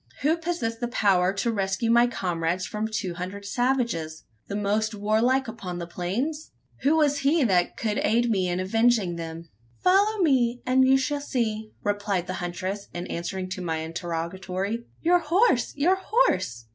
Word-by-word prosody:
Who 310 +3 +4
possessed 320 -10 -3
the 240 - -1
power 190 -5 +2
to 205 +4 0
rescue 195 +2 0
my 235 +1 +5
comrades 180 -4 -1
from 210 +4 -3
two 215 -5 -3
hundred 185 +3 -6
savages 230 -10 -1 0.2
the 200 - -4
most 210 +2 0
warlike 225 +6 +2
upon 190 -6 -6
the 170 - -4
plains? 230 - -3 0.3
Who 290 +4 +3
was 290 -2 +3
he 285 +3 +3
that 185 -6 +2
could 215 -2 -1
aid 235 +3 +2
me 190 -4 +1
in 175 +1 -1
avenging 215 -1 +2
them? 165 0 -7 0.3
"Follow 405 +4 +4
me, 250 -5 +2
and 260 +1 +4
you 265 +1 +6
shall 285 +2 -1
see!" 220 -5 -2
replied 205 -3 -1
the 185 - -4
huntress, 185 +3 -4
in 175 0 -4
answer 180 +2 -3
to 185 +1 -5
my 165 -2 -2
interrogatory. 180 +6 -4 0.2
"Your 355 +2 +5
horse! 340 - +2
your 355 +7 +2
horse! 185 - +1
215 Hz, 165 wpm, -26 LUFS, 180-255 Hz, 0.3 s, you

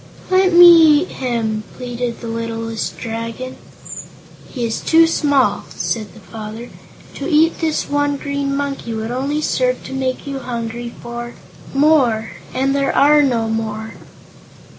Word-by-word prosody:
"Let 370 0 +4
me 335 -4 +8
eat - - -9
him!" 225 -4 -2
pleaded 245 -1 -4
the 235 - -6
littlest 225 0 -4
Dragon. 230 +3 -5 0.9
"He 245 -3 -3
is 225 -1 -3
too 330 0 +5
small," 280 -9 +1
said 215 -3 -4
the - - -12
father. 220 +2 -9 0.4
"To - - -5
eat 320 +1 +3
this 315 -2 -1
one 290 0 0
Green 280 -1 -2
Monkey 275 -5 -3
would 220 +1 -4
only 280 +4 -1
serve 255 -2 0
to - - -8
make 265 0 -2
you 275 -1 -4
hungry 235 -1 -5
for 240 0 -7 0.4
more, 270 -7 +3 0.2
and 270 +1 0
there 275 0 0
are 295 +1 +6
no 240 -5 +1
more." 220 0 -3
255 Hz, 140 wpm, -18 LUFS, 230-285 Hz, 0.9 s, me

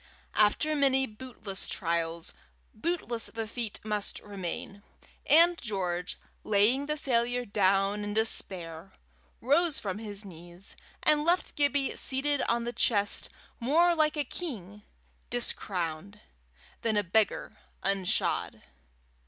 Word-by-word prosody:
After 215 +9 +3
many 265 -2 +3
bootless 215 -4 -6
trials, 170 -2 -2 0.4
bootless 240 -3 -1
the 225 -1 -4
feet 225 -1 -3
must 210 -1 -2
remain, 200 0 -6 0.5
and 335 +3 +6
George, 180 -5 -2 0.3
laying 215 +7 +3
the 300 0 -1
failure 245 -3 0
down 200 0 +2
in 205 0 -4
despair, 185 -5 +1 0.5
rose 290 +5 +3
from 200 0 -4
his 210 -2 -5
knees, 175 +1 -10 0.3
and 300 -1 +4
left 345 +3 +1
Gibbie 285 -1 +2
seated 280 +1 +2
on 235 0 +1
the 240 +1 -3
chest 205 -5 +1 0.3
more 325 +8 +4
like 310 -1 +2
a 295 - +2
king 210 - -6 0.5
discrowned, 195 -5 -3 0.6
than 220 -2 +1
a 205 - +3
beggar 210 +4 +1 0.3
unshod. 195 -2 0
215 Hz, 115 wpm, -29 LUFS, 195-275 Hz, 0.6 s, and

